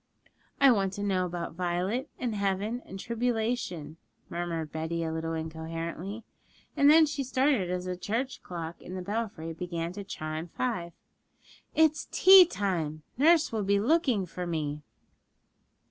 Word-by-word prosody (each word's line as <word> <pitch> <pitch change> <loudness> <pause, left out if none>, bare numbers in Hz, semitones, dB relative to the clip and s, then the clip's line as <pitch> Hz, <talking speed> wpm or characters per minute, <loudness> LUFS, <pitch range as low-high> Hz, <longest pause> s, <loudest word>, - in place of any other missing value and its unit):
'I 275 -1 +7
want 195 -4 +1
to 205 - -4
know 185 -2 +1
about 170 -1 -5
Violet, 180 - -1
and 240 -3 -2
heaven, 200 +4 -1
and 190 - -8
tribulation,' 225 -9 -2 0.3
murmured 170 -3 -3
Betty 160 +1 -2
a 160 -1 -2
little 165 0 -3
incoherently; 165 +6 -5 0.5
and 285 -1 +5
then 315 +1 +8
she 285 -2 -3
started 260 -6 +1
as 180 0 -2
the 180 0 -2
church 230 +8 -3
clock 170 -2 -7
in 180 - -8
the 185 - -4
belfry 205 -5 -3
began 170 0 -4
to 200 +1 -6
chime 155 -2 -5
five. 175 -4 -3 0.8
'It's 315 -1 +3
tea 375 -2 +9
time; 165 - -2
nurse 320 +4 +4
will 220 -2 -1
be 200 +1 +2
looking 250 - +2
for 180 +1 -6
me.' 150 -3 -2
185 Hz, 145 wpm, -29 LUFS, 165-235 Hz, 0.8 s, tea